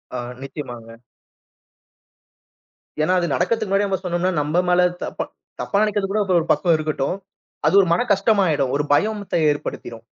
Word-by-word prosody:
ஆ, - - -2 0.2
நிச்சயமாங்க. 120 -5 -8 2.0
ஏன்னா, 170 +4 +2
அது 175 - -1
நடக்கறதுக்கு 215 +5 0
முன்னாடியே 200 +1 +2
நம்ம 190 -1 -1
சொன்னோம்னா, 180 0 0
நம்ப 150 +3 -1
மேல 180 0 +4 0.2
தப்பா, - - -4 0.4
தப்பா 200 - 0
நெனைக்கிறது 205 -2 -1
கூட 210 - +1 0.2
ஒரு 160 - -5
பக்கம் 170 -3 +3
இருக்கட்டும். 155 0 -2 0.5
அது - - +3
ஒரு 185 - 0
மன 175 - +2
கஷ்டம் 200 +1 +2
ஆயிடும். 145 -5 +1
ஒரு 145 - +1
பயமுத்த 210 +5 0 0.2
ஏற்படுத்திரும். 120 -5 -6
175 Hz, 150 wpm, -21 LUFS, 145-195 Hz, 2.0 s, மேல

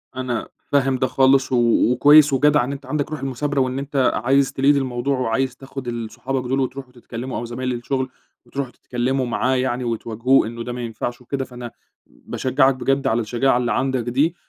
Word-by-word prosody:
أنا 125 -3 -3 0.2
فاهم 135 -2 +2
ده 130 - +1
خالص 135 0 +3
و - - +2 0.4
وكويّس 145 +3 +6
وجدع 145 -1 +4
إن 130 - -3
أنت 140 0 -7
عندك 145 +3 -2
روح 155 - -4
المثابرة 135 +2 -2
وإن 130 +1 -1
أنت 140 -1 +1
عايز 135 +2 +3
تlead - - -11
الموضوع 135 -1 +2
وعايز 125 +1 0
تاخد 135 -1 -8
ال 115 -2 -4
صحابك 130 -1 -3
دول 135 +1 +1
وتروحوا 130 0 -4
تتكلموا، 120 +1 -6
أو 120 - -4
زمايل 125 +2 -3
الشغل 130 +2 -2 0.4
وتروحوا 135 -2 -5
تتكلموا 130 +2 -2
معاه 125 +2 0
يعني 130 -1 -1
وتواجهوه 115 +2 +1
إنّه 115 +1 -6
ده 120 - -5
ما 125 - -5
ينفعش 120 +1 -5
وكده، 135 +2 -3
فأنا 125 -2 -9 0.4
باشجعك 130 +1 0
بجد 135 +1 0
على 120 -2 +1
الشجاعة 120 +3 +1
اللي 120 -2 -1
عندك 130 0 0
دي 145 +8 +1
130 Hz, 185 wpm, -21 LUFS, 120-135 Hz, 0.4 s, وكويّس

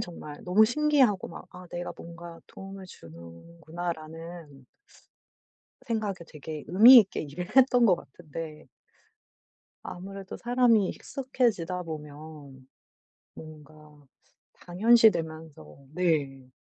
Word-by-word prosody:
정말 150 -4 -8
너무 195 +5 +5
신기하고 265 -6 +2
막 - - -11
'아 180 0 -11
내가 175 0 -5
뭔가 170 0 -11
도움을 195 0 -11
주는구나.'라는 160 - -9 1.2
생각에 210 -7 -3
되게 155 -1 -9
의미 235 +8 +9
있게 200 -4 +1
일을 175 - -8
했던 250 -2 +5
것 185 - +5
같은데 155 0 -10 1.2
아무래도 195 +1 -8
사람이 240 -5 +2
익숙해지다 230 -10 -2
보면 150 -3 -10 0.7
뭔가 150 -1 -14 0.5
당연시되면서 165 - +1
네. 140 -7 -1
170 Hz, 230 characters per minute, -27 LUFS, 150-195 Hz, 1.2 s, 의미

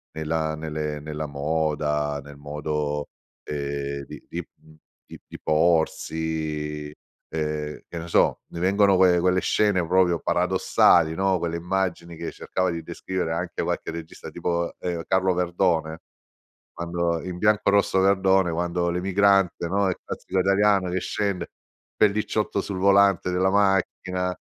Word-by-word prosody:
nella 80 0 -1
nelle 75 -1 -4
nella 75 0 -5
moda, 75 0 -1
nel 70 0 -12
modo, 75 0 -3 0.4
ehm, 70 -1 -4
di - - -11
di 85 0 -5
mhmm, 80 0 -19 0.3
di - - -11
di - - -10
porsi, 80 -2 0 0.4
ehm, 75 -1 -3
che 85 - -8
ne 80 - -7
so, 85 - +2
ne 85 - -6
vengono 100 +2 +4
que 90 -1 +5
quelle 90 +1 +2
scene 105 -4 +2
proprio 90 -2 +3
paradossali, 90 -3 +3
no, 95 0 +1
quelle 85 0 -2
immagini 85 -1 -2
che 85 - -5
cercava 95 0 -2
di 85 -1 -5
descrivere 85 +1 -3
anche 85 +1 -3
qualche - - -2
regista 80 -1 -8
tipo, 85 -1 -2
ehm, 85 -2 -3
Carlo 95 0 +2
Verdone 85 -3 0 0.7
quando 85 -1 -2
in 90 -1 -5
"Bianco 105 0 +3
Rosso 100 -1 +2
e - - +4
Verdone" 95 -2 +3
quando 85 +1 -1
l'emigrante, 95 0 +2
no, 100 +2 +1
il 90 - -2
classico 95 - -3
italiano 100 0 +3
che 95 - 0
scende, 100 -3 -2 0.4
pellicciotto 105 -1 +1
sul 100 -1 -5
volante 100 -2 +4
della 95 +1 +2
macchina, 95 -2 +1
85 Hz, 140 wpm, -24 LUFS, 80-95 Hz, 0.7 s, que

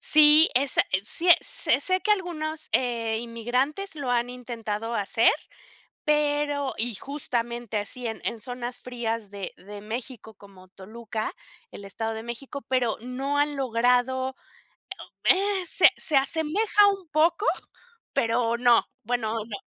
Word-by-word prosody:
Sí, 305 +1 +7
es 270 0 +2
es 190 +2 -1
sí 345 +2 0
es 345 - +4
es - - +4
sé 370 0 +1
que 430 - -2
algunos, 320 -5 -2
eh, 230 -3 +1
inmigrantes 250 - -2
lo 280 -4 -4
han 245 0 0
intentado 230 -2 -5
hacer, 210 +3 +3 0.8
pero 290 -2 +1
y 230 -1 0
justamente 240 -4 -4
así 230 +4 -3
en 225 - -6
en 230 - -1
zonas 245 +1 -6
frías 230 -4 -4
de 200 -1 -7
de 205 +2 -10
México 225 0 -7
como 190 -2 -17
Toluca, 220 +3 -6 0.4
el 200 - -10
Estado 225 +3 -4
de 220 - -6
México, 265 +4 -7
pero 250 -4 0
no 265 +4 -3
han 290 0 +1
logrado, 255 +1 +1 0.9
eh, 390 -1 +2
se - - +6
se 300 - +1
asemeja 330 +9 +3
un 390 -3 -4
poco, 335 +7 +2 0.7
pero 230 0 +1
no, 240 -1 +4 0.2
bueno, 230 -1 -2
no. 210 -3 -6
245 Hz, 140 wpm, -26 LUFS, 225-295 Hz, 0.9 s, Sí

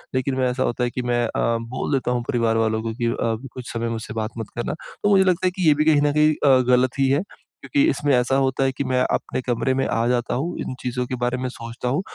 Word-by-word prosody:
लेकिन 130 +1 0
मैं 130 -1 +2
ऐसा 130 +1 -1
होता 120 +1 -1
है 120 - +1
कि 125 - -4
मैं 120 0 +2
अ, - - -3 0.3
बोल 115 +2 -4
देता 130 -2 0
हूँ 120 -1 -1
परिवार 115 -2 +1
वालों 110 0 +1
को 115 -1 -3
कि 120 0 -3
अ, 115 -1 0 0.2
कुछ 125 -2 -7
समय 115 0 -2
मुझसे 110 -1 -5
बात 110 0 -3
मत 115 - -5
करना। 120 - -2 0.3
तो 205 - +3
मुझे 195 -2 +5
लगता 185 0 +2
है - - +1
कि 185 -3 0
ये 150 - +7
भी 150 +1 +1
कहीं 155 -2 +4
न 145 0 +3
कहीं 150 +1 +4
अ, 135 -3 +4
गलत 125 +1 +3
ही 135 - +4
है 140 +3 +2 0.4
क्योंकि 285 - +1
इसमें 145 - +1
ऐसा 125 +2 +2
होता 135 0 +1
है 135 - +2
कि - - 0
मैं 130 -2 0
अपने - - -2
कमरे 125 +1 0
में 135 0 0
आ 115 - 0
जाता 120 0 0
हूँ, 160 +8 -3
इन - - -4
चीज़ों 125 0 -2
के 130 - -3
बारे 125 +1 -1
में 130 - -3
सोचता 115 +1 -6
हूँ, 140 +8 0
125 Hz, 275 wpm, -22 LUFS, 120-140 Hz, 0.4 s, ये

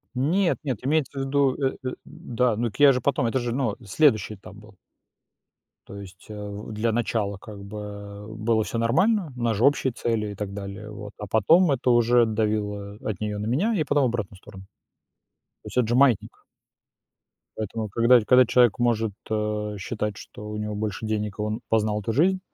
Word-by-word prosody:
Нет, 170 +8 +1
нет, 130 -5 -1
имеется 145 -2 0
в - - -1
виду 135 -1 +2
э 135 -2 -1
э 130 - -3
Да. 120 -1 -1
Ну 120 +2 -1
так 100 - -14
я 145 -1 +8
же 125 -1 -1
потом 140 0 +1
это 115 +3 0
же, 120 0 -2
ну, 120 -4 -1
следующий 110 -1 +2
этап 95 +1 -13
был. 105 0 -15 1.1
То 100 - -9
есть, 95 -2 -12
а, - - -7 0.2
в 100 +2 -7
для 110 +2 0
начала 110 -3 -1
как 100 0 -11
бы, 105 +2 -8
э, 100 0 -8
было 110 0 0
всё 115 - -4
нормально, 165 - +2
у 120 - -7
нас 115 -3 +1
же 115 - +3
общие 140 -2 +3
цели 115 -3 -2
и - - -8
так 100 0 -5
далее, 100 +1 -7
вот, 105 -1 -8
а 105 - -7
потом 150 - +4
это 130 -1 0
уже 120 0 +5
давило 105 -2 -2
от 105 -4 -3
неё 105 -1 -3
на 105 - -3
меня 180 - +1
и 165 - +1
потом 145 -1 +2
в - - +4
обратную 115 -5 -4
сторону. 95 0 -13 1.0
То - - -13
есть, - - -7
это 125 -3 +3
же 120 - +1
маятник. 130 -5 +2 1.1
Поэтому, 110 0 -4
когда 115 +4 +5
когда 125 +3 +5
человек 120 -2 +3
может, 115 -3 +1 0.2
э, 105 -1 -2
считать, 105 0 -3
что 105 - -10
у 105 - -5
него 105 0 -3
больше 105 0 -3
денег 105 -1 -3
и - - -1
он 105 +2 -2
познал 105 -1 +1
эту 115 - -2
жизнь, 185 +9 +3
110 Hz, 200 wpm, -25 LUFS, 105-125 Hz, 1.1 s, я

